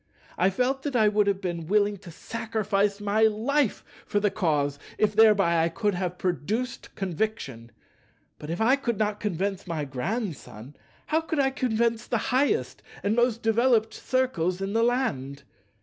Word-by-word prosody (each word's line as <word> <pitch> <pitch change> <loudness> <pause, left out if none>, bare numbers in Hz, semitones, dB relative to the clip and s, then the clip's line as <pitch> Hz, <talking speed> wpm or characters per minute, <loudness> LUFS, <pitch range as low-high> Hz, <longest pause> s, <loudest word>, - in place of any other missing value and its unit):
I 185 - +3
felt 255 +7 0
that 280 -1 -4
I 220 -3 +5
would 210 0 +2
have 200 -1 0
been 170 -4 -4
willing 205 +1 +2
to 185 -2 -13
sacrifice 210 +1 -1
my 205 +1 0
life 225 +4 +1 0.2
for 205 - 0
the 205 -1 +1
Cause, 145 -7 0 0.2
if 210 -1 +1
thereby 200 -7 +5
I 165 - +2
could 205 +5 -1
have 180 0 -3
produced 205 +9 -3
conviction. 170 - -3 0.7
But 150 - -8
if 170 - -3
I 245 +5 +4
could 235 -5 -2
not 210 -1 -1
convince 195 -1 -2
my 160 -4 -2
Grandson, 145 - -5 0.3
how 315 +1 +1
could 320 -1 -3
I 270 -1 +3
convince 235 -3 0
the 235 - +1 0.2
highest 290 - +1 0.2
and 205 +2 +1
most 240 -1 +1
developed 225 0 +3
Circles 190 -9 -1
in 195 +1 -3
the 225 - +2
land? 205 - -1
210 Hz, 165 wpm, -26 LUFS, 180-235 Hz, 0.7 s, I